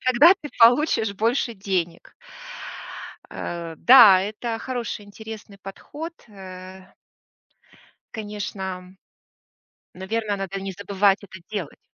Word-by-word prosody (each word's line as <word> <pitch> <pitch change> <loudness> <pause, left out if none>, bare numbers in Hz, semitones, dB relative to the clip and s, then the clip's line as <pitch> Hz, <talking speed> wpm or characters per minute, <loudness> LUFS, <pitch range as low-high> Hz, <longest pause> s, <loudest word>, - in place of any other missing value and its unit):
тогда 275 +9 +7
ты 295 - -7
получишь 230 -3 +4
больше 230 +3 0
денег". 185 -4 -3 1.2
Э, 170 -1 -6
да, 225 - +8
это 220 +3 -4
хороший, 240 -4 -5
интересный 215 0 -10
подход. 290 - -8 0.2
Э 185 -1 -11 1.2
Конечно, 210 -2 -6 0.2
м, 185 +1 -17 1.0
наверно, 205 +3 -2
надо 195 0 -5
не 195 - -4
забывать 200 +1 +1
это 190 -1 -11
делать. 190 -9 -5
205 Hz, 100 wpm, -23 LUFS, 190-230 Hz, 1.2 s, да